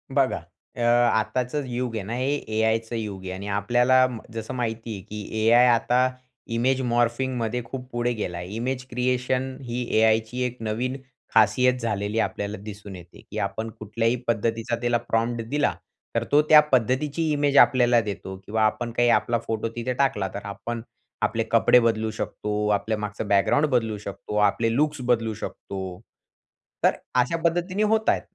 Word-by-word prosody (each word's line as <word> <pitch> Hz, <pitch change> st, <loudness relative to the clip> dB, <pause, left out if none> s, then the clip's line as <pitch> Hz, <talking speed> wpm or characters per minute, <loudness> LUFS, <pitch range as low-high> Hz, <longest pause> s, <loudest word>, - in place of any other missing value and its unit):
बघा 135 Hz, -2 st, +2 dB, 0.4 s
अ, 120 Hz, -, -5 dB
आताचं 120 Hz, +3 st, +2 dB
युग 125 Hz, -1 st, -3 dB
आहे 110 Hz, -, -3 dB
ना 110 Hz, -, -5 dB
हे 130 Hz, +3 st, 0 dB, 0.2 s
A-Iचं 110 Hz, +1 st, +1 dB
युग 105 Hz, -4 st, -5 dB
आहे 95 Hz, -, -5 dB
आणि 95 Hz, +2 st, -6 dB
आपल्याला 125 Hz, +5 st, +4 dB, 0.3 s
जसं 115 Hz, +2 st, -5 dB
माहिती 115 Hz, -2 st, -3 dB
आहे 100 Hz, -, -7 dB
की 105 Hz, +2 st, -3 dB
A-I 120 Hz, +1 st, +7 dB
आता 125 Hz, +2 st, +2 dB, 0.5 s
इमेज 130 Hz, +2 st, +2 dB
मॉर्फिंगमध्ये 120 Hz, 0 st, 0 dB
खूप 125 Hz, +2 st, -8 dB
पुढे 120 Hz, 0 st, 0 dB
गेला 90 Hz, -6 st, -4 dB
आहे. 90 Hz, -, -6 dB
इमेज 125 Hz, +2 st, -3 dB
क्रिएशन 125 Hz, +1 st, -1 dB
ही 125 Hz, 0 st, -3 dB, 0.2 s
A-Iची 110 Hz, +2 st, +2 dB
1 125 Hz, 0 st, -4 dB
नवीन 115 Hz, +4 st, -2 dB, 0.4 s
खासियत 125 Hz, +4 st, +4 dB
झालेली 105 Hz, -1 st, -1 dB
आपल्याला 105 Hz, -1 st, -2 dB
दिसून 105 Hz, -2 st, -9 dB
येते 90 Hz, -1 st, -13 dB
की -, -, -6 dB
आपण 110 Hz, +3 st, -3 dB
कुठल्याही 115 Hz, +3 st, 0 dB
पद्धतीचा 115 Hz, +1 st, 0 dB
त्याला 120 Hz, 0 st, +2 dB
प्रॉम्प्ट 115 Hz, 0 st, -1 dB
दिला. 145 Hz, 0 st, +1 dB, 0.4 s
तर -, -, +1 dB
तो 145 Hz, -, +6 dB
त्या 155 Hz, -, +10 dB
पद्धतीची 135 Hz, +6 st, +1 dB
इमेज 145 Hz, -1 st, +2 dB
आपल्याला 120 Hz, -1 st, +3 dB
देतो 100 Hz, -2 st, -6 dB
किंवा 110 Hz, +1 st, 0 dB
आपण 120 Hz, +2 st, -1 dB
काही 120 Hz, +1 st, +2 dB
आपला 120 Hz, 0 st, 0 dB
फोटो 110 Hz, 0 st, -1 dB
तिथे 120 Hz, +2 st, -2 dB
टाकला 125 Hz, -7 st, +1 dB
तर 100 Hz, 0 st, -6 dB
आपण 100 Hz, +4 st, -5 dB, 0.4 s
आपले -, -, +1 dB
कपडे 125 Hz, -, +6 dB
बदलू 110 Hz, -1 st, +1 dB
शकतो. 105 Hz, -1 st, -3 dB
आपल्या 105 Hz, +1 st, 0 dB
मागचं 105 Hz, 0 st, -4 dB
बॅकग्राउंड 100 Hz, +9 st, +3 dB
बदलू 115 Hz, -5 st, 0 dB
शकतो. 100 Hz, +1 st, -7 dB
आपले 110 Hz, +3 st, +2 dB
लुक्स 150 Hz, 0 st, +1 dB
बदलू 115 Hz, -2 st, +1 dB
शकतो. 95 Hz, -3 st, -6 dB, 0.8 s
तर -, -, +4 dB, 0.2 s
अशा 125 Hz, +7 st, +1 dB
पद्धतीने 175 Hz, +4 st, +1 dB
होतायेत. 220 Hz, +1 st, +2 dB
115 Hz, 160 wpm, -25 LUFS, 110-125 Hz, 0.8 s, त्या